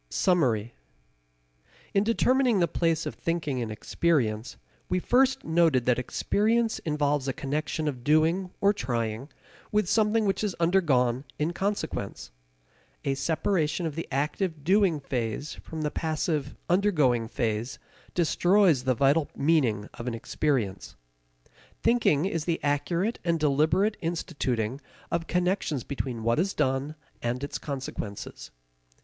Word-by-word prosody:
Summary. 120 - +1 1.2
In 195 - +3
determining 245 0 +3
the 170 - +3
place 165 -1 0
of - - -3
thinking 155 -6 -2
in 115 -2 -3
experience 115 -1 0 0.3
we 180 - +1
first 255 +8 +2
noted 160 -7 +3
that 125 -1 +3
experience 220 - +1
involves 145 -3 0
a 135 - 0
connection 150 +3 -2
of 130 -5 -3
doing 160 +6 +2
or 200 +1 +5
trying 120 - -3 0.4
with 210 -3 +2
something 220 +2 +2
which 195 +1 0
is 205 -4 -1
undergone 140 -8 +2
in 155 +3 -1
consequence. 200 +3 -3 0.7
A 140 - +1
separation 160 +3 0
of 160 - -2
the 165 +3 -5
active 150 +3 -1
doing 185 -2 +3
phase 130 +1 -3
from 160 -1 -7
the 150 - -1
passive 155 -3 -2
undergoing 155 - +2
phase 115 +1 -2 0.4
destroys 175 -4 +3
the 130 -1 +2
vital 140 +5 +3
meaning 130 -9 +2
of 120 - -7
an 120 - -1
experience. 115 -5 -2 0.9
Thinking 225 -10 +3
is 165 -5 -2
the 170 -2 0
accurate 170 +9 0
and 170 -2 +1
deliberate 155 +8 +2
instituting 135 -7 -2 0.3
of 165 -1 -1
connections 180 - 0
between 130 -5 -4
what 115 +5 +2
is 195 +3 0
done 135 +3 0 0.3
and 120 +3 -2
its 140 - -4
consequences. 130 -8 -6
155 Hz, 130 wpm, -27 LUFS, 130-180 Hz, 1.2 s, or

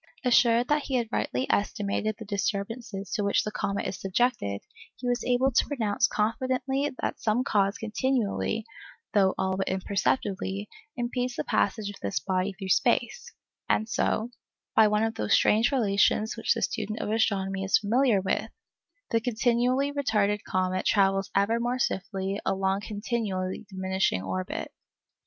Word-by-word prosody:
Assured 240 -1 +4
that 295 0 +2
he 265 - -2
had 235 -3 0
rightly 260 - -1
estimated 205 +1 0
the 220 - -8
disturbances 200 0 -3
to 210 - 0
which 200 - +2
the 210 - -4
comet 200 -1 -2
is - - -4
subjected, 195 - 0 0.3
he 250 - -6
was 245 0 0
able 255 +2 +2
to - - +3
pronounce 230 -5 +1
confidently 260 +6 0
that - - -2
some 225 +3 +1
cause 200 -4 +1
continually 225 -1 -1 0.5
(though 195 -3 +3
all 190 0 0
but 195 - -1
imperceptibly) 195 +1 -1 0.3
impedes 245 +1 -2
the - - -2
passage 210 +1 0
of 205 - -12
this 100 +6 -1
body 185 +5 -1
through 190 0 -7
space, 485 - +1 0.4
and 215 - +2
so—by 225 -1 0
one 210 +1 +2
of 225 0 0
those 225 - 0
strange 225 +5 +4
relations 215 -3 +2
which 225 - +1
the - - -2
student 215 -1 -2
of 210 - -2
astronomy 195 -3 0
is 190 - +4
familiar 225 0 +2
with—the 225 - -4
continually 245 +3 +1
retarded 210 -8 +1
comet 185 0 -1
travels 195 -1 +2
ever 205 +4 +2
more 240 +2 -1
swiftly 195 -3 -2
along 195 0 0
a - - -7
continually 205 -3 -3
diminishing 190 - 0
orbit. 95 -1 -4
215 Hz, 150 wpm, -27 LUFS, 195-240 Hz, 0.5 s, Assured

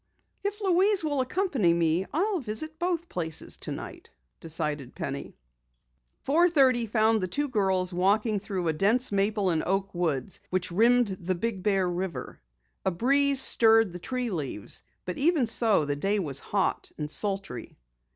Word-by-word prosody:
"If 405 +1 -3
Louise 385 0 +2
will 290 -3 0
accompany 255 - 0
me, 170 +2 0
I'll 380 +4 0
visit 310 +6 -4
both 345 -1 -2
places 160 - -4
tonight," - - -8 0.3
decided 150 -5 -3
Penny. 140 0 -6 0.9
Four 335 +6 +3
thirty 260 -7 +3
found 220 0 +2
the 185 - -2
two 290 +9 -2
girls 190 -6 +1
walking 205 +4 +1
through 190 -3 -4
a 160 - +1
dense 215 +10 +2
maple 200 -1 0
and 160 -2 0
oak 195 +1 -2
woods 170 -2 -2
which 185 -1 -2
rimmed 235 +4 +3
the 185 +1 -2
Big 200 +1 -3
Bear 195 -2 +1
River. 175 - -5 0.4
A 190 - +1
breeze 275 +8 +4
stirred 225 -4 +5
the 180 - -7
tree 250 +4 -3
leaves, 140 - -2 0.2
but 180 - -5
even 305 -2 +2
so 220 -7 +3
the 145 0 -2
day 195 +8 0
was 145 -8 +1
hot 195 +4 -2
and 150 - -4
sultry. 195 - -2
205 Hz, 155 wpm, -27 LUFS, 175-260 Hz, 0.9 s, stirred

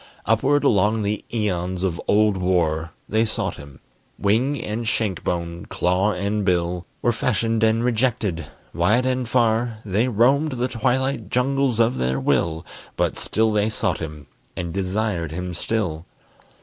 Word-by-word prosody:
Upward 135 +7 +2
along 105 -3 +3
the 105 +1 -2
æons 95 -5 -1
of 85 -3 -1
old 105 0 +4
war 85 -4 0 0.2
They 110 +1 +2
sought 110 - -2
him: 70 -2 -12 0.4
wing 120 +8 +1
and 110 +2 -4
shank 105 -5 -1
bone, 85 -1 -3
claw 95 +4 +1
and 100 +3 -1
bill, 90 -1 0 0.2
Were 120 - +4
fashioned 115 0 0
and 110 +1 +3
rejected; 110 - 0 0.3
wide 105 +9 +2
and 130 -2 -1
far 115 -1 +2
They 105 +5 +1
roamed 135 +6 +3
the 125 0 -1
twilight 125 -1 0
jungles 130 -1 +1
of 115 +2 +2
their 65 +1 0
will; 80 +1 0 0.3
But - - +1
still 110 0 +1
they 105 0 +2
sought 110 - -1
him, 75 -2 -7 0.3
and 85 -1 -3
desired 95 -3 -1
him 90 +1 -4
still. 85 -4 -2
105 Hz, 150 wpm, -22 LUFS, 90-115 Hz, 0.4 s, old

